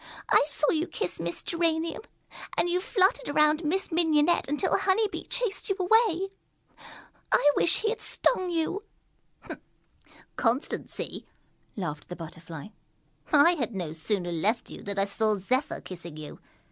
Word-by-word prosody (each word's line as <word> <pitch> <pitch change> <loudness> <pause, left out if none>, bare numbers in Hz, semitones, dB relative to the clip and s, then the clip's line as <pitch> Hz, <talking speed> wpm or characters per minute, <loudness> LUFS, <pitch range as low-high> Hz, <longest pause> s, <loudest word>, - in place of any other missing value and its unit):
I - - +6
saw 300 0 +2
you 325 +2 0
kiss 180 - -4
Miss 170 +1 -4
Geranium, 330 0 0 0.6
and - - +3
you 355 +1 +1
fluttered 380 -5 +2
around 305 +2 +3
Miss 370 +6 -1
Mignonette 320 0 +3
until 295 +7 +1
Honey 420 +3 +2
Bee - - -7
chased 480 -6 -2
you 390 - +1
away. 390 -1 +3 1.0
I 290 - +5
wish 340 - +3
he 440 - +1
had 455 0 -3
stung 370 -7 +1
you!" 340 +4 -1 1.6
"Constancy!" 245 +4 -1 0.5
laughed 155 -7 -5
the 180 - -5
Butterfly. 165 0 -9 0.6
"I 300 +3 +7
had 240 - -3
no 170 -5 -3
sooner 175 +2 -2
left 205 +8 0
you - - -8
than 200 0 -4
I 195 - +3
saw 215 +2 +2
Zephyr 260 - -1
kissing 170 -4 -9
you. 155 -1 -9
300 Hz, 145 wpm, -28 LUFS, -, 1.6 s, I